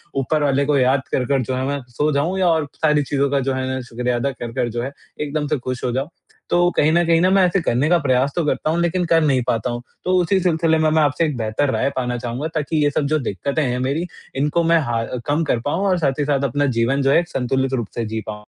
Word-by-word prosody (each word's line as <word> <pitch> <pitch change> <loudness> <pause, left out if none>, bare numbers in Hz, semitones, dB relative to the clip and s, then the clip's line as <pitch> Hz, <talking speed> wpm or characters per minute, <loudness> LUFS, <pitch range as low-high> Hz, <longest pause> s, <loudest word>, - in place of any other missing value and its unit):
ऊपर 145 +3 0
वाले 140 0 +2
को 145 -1 +2
याद 130 +1 +3
कर-कर 135 +1 +1
जो 130 +2 -3
है 130 +1 -2
ना 140 -1 -2
सो 145 +6 0
जाऊँ 160 +7 0
या 185 - +3
और 160 -3 +2
सारी 150 -2 +2
चीज़ों 140 0 0
का 140 - +2
जो 135 - 0
है 130 0 -2
ना 130 - -3
शुक्रिया 125 +1 -1
अदा 135 +3 -1
कर-कर 120 -1 -3
जो 120 +1 -3
है 135 - -4 0.3
एकदम 150 0 -2
से 150 0 0
खुश 130 0 -5
हो 125 - 0
जाऊँ। 135 +6 -2 0.4
तो 175 0 +3
कहीं 150 - +4
न 175 +1 +4
कहीं 165 0 +3
ना 185 - +4
मैं 195 -1 +5
ऐसे 180 +2 +1
करने 135 0 +1
का 175 - +5
प्रयास 135 -1 +1
तो 175 - +1
करता 150 - 0
हूँ 165 +2 +1
लेकिन 175 +1 0
कर 165 0 +3
नहीं 135 -4 +2
पाता 115 +2 0
हूँ। 120 0 -4 0.2
तो 185 - +1
उसी 190 +3 +2
सिलसिले 165 -2 +2
में 155 0 +2
मैं 155 0 +3
आपसे 150 +3 +2
एक 150 -3 -2
बेहतर 110 +5 0
राय - - +1
पाना 125 -1 -1
चाहूँगा 120 +5 -4
ताकि 155 0 0
ये 145 - +3
सब 145 - 0
जो 155 - +3
दिक्कतें 140 - -2
हैं 125 -2 -1
मेरी 140 +7 -1 0.3
इनको 150 +5 +1
मैं 165 0 +4
हाँ, 120 -5 -1 0.2
कम 150 +3 +1
कर 125 -6 0
पाऊंँ 165 +7 0
और 185 - +2
साथ 140 -3 0
ही 145 - +1
साथ 140 -1 0
अपना 145 +3 +1
जीवन 135 +4 +1
जो 135 0 +2
है - - +5
एक 175 -1 -4
संतुलित 130 0 -1
रूप 120 -5 -1
से 115 - -2
जी 110 +1 -4
पाऊँ। 105 0 -7
140 Hz, 270 wpm, -20 LUFS, 130-160 Hz, 0.4 s, मैं